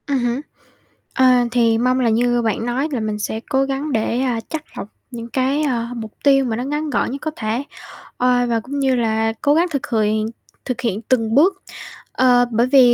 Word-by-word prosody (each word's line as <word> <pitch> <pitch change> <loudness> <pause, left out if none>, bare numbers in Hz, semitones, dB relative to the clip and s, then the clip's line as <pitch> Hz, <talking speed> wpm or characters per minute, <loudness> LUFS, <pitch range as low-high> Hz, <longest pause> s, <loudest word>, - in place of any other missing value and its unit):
Ừm 280 -2 +1
hứm, 240 +2 -1 0.7
ờ, 260 - +3 0.3
thì 230 -2 +3
mong 255 +2 +1
là 245 -3 +2
như 240 +2 +2
bạn 225 0 -1
nói 250 +5 -1
là 260 - -1
mình 215 -1 -3
sẽ 220 +1 -3
cố 270 -1 +2
gắng 275 +2 -3
để, 230 0 0
à, 250 -3 0
chắt 315 -1 -4
lọc - - -5 0.2
những 235 -1 -7
cái, 265 +5 0
à, 240 -5 -1
mục 220 -2 -6
tiêu 275 -1 +4
mà 230 -3 -1
nó 240 - -3
ngắn 295 +3 -2
gọn 285 - 0
nhất 275 - -6
có 315 - -3
thể, 220 +4 -2 0.5
ờ, 245 0 +2
và 230 -1 +1
cũng 275 +5 -5
như 265 -2 +2
là 225 -1 0
cố 290 - +3
gắng 335 +4 +3
thực 280 -3 -2
khiện 215 -2 +1 0.5
thực 255 -1 -3
hiện 220 -4 -1
từng 225 -1 0
bước, 380 +7 +4 0.5
ờ, 245 -1 +4
bởi 235 +2 +2
vì 255 -2 +6
245 Hz, 215 wpm, -20 LUFS, 230-270 Hz, 0.7 s, vì